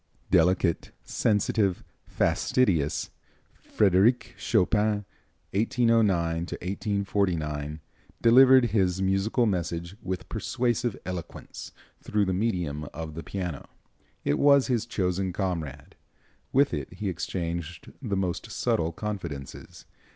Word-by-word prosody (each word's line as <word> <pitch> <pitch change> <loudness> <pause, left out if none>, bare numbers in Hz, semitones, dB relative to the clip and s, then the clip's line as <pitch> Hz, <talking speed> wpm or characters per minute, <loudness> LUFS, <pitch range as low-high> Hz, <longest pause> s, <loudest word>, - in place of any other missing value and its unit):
Delicate, 90 0 +2
sensitive, 105 -3 +1 0.2
fastidious, 85 - +1 0.4
Frédéric 105 +4 +2
Chopin 105 0 +1 0.5
(1809 115 +1 +3 0.3
1849) 90 -5 -2 0.4
delivered 130 +2 +7
his 95 -3 +1
musical 95 +5 +1
message 85 -2 -2
with 95 -1 -4
persuasive 120 -2 -1
eloquence 90 -3 -7 0.3
through 105 -1 0
the 95 - 0
medium 90 -8 -2
of 80 -1 -6
the 80 - -6
piano. 90 -5 -5 0.6
It 70 - +1
was 140 -2 +5
his 120 -4 0
chosen 95 0 -1
comrade. 80 -7 -4 0.6
With 140 +2 +3
it 70 +3 -4
he 100 +2 -4
exchanged 85 -2 -4
the 105 -7 -2
most 90 -2 -2
subtle 80 0 0
confidences. 85 -8 -7
95 Hz, 100 wpm, -27 LUFS, 85-110 Hz, 0.6 s, delivered